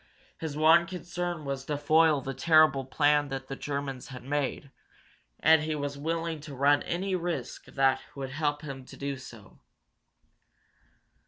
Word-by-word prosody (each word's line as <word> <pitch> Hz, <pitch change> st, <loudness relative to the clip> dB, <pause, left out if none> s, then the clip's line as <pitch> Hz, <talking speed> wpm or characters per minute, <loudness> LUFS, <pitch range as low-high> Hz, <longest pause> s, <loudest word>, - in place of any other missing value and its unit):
His 155 Hz, -3 st, -4 dB
one 165 Hz, +2 st, +6 dB
concern 175 Hz, -3 st, -4 dB
was 135 Hz, -1 st, -3 dB
to 145 Hz, 0 st, -2 dB
foil 155 Hz, 0 st, +4 dB
the 135 Hz, +1 st, -4 dB
terrible 155 Hz, -2 st, +4 dB
plan 145 Hz, +2 st, +2 dB
that 135 Hz, -1 st, -6 dB
the 135 Hz, -, -4 dB
Germans 140 Hz, -2 st, -4 dB
had 125 Hz, -2 st, -9 dB
made, 140 Hz, 0 st, -2 dB, 0.7 s
and 160 Hz, 0 st, +6 dB
he 155 Hz, 0 st, -2 dB
was 145 Hz, -1 st, -3 dB
willing 165 Hz, +2 st, -2 dB
to 145 Hz, -1 st, -9 dB
run 145 Hz, +2 st, +4 dB
any 190 Hz, +3 st, -2 dB
risk 175 Hz, -2 st, -3 dB
that 135 Hz, -1 st, +2 dB
would 135 Hz, -2 st, -5 dB
help 145 Hz, +1 st, -1 dB
him 135 Hz, -3 st, -7 dB
to -, -, -13 dB
do 140 Hz, 0 st, -3 dB
so. 115 Hz, -6 st, -13 dB
145 Hz, 155 wpm, -29 LUFS, 135-160 Hz, 0.7 s, one